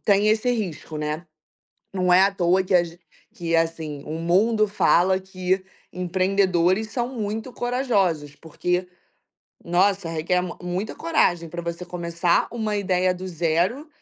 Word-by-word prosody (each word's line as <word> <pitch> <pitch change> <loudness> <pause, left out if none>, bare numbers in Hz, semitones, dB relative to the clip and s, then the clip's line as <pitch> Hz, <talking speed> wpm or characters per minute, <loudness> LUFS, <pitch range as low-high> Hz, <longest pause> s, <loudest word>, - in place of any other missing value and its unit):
tem 205 0 +4
esse 220 +3 +2
risco, 185 -9 -3
né. 150 +3 -3 0.7
Não 180 -1 +1
é 180 - +7
à 195 +1 +3
toa 185 0 +2
que 185 - -3
as 170 -1 +2 0.4
que, 165 -1 -1
assim, 160 -3 -1
o 155 - -5
mundo 200 +7 +2
fala 190 -2 +3
que 185 0 -2 0.3
empreendedores 185 +2 +1
são 240 -1 -1
muito 220 -1 -4
corajosos, 200 - 0
porque, 180 +3 -2 0.8
nossa, 190 +1 +2
requer 165 +2 0
m 180 -1 -5
muita 180 +4 -3
coragem 165 0 +1
pra 175 +2 -5
você 170 +1 -5
começar 175 -1 0
uma 220 -3 -2
ideia 185 -2 +1
do 185 +1 -7
zero, 175 - 0
180 Hz, 140 wpm, -23 LUFS, 170-200 Hz, 0.8 s, é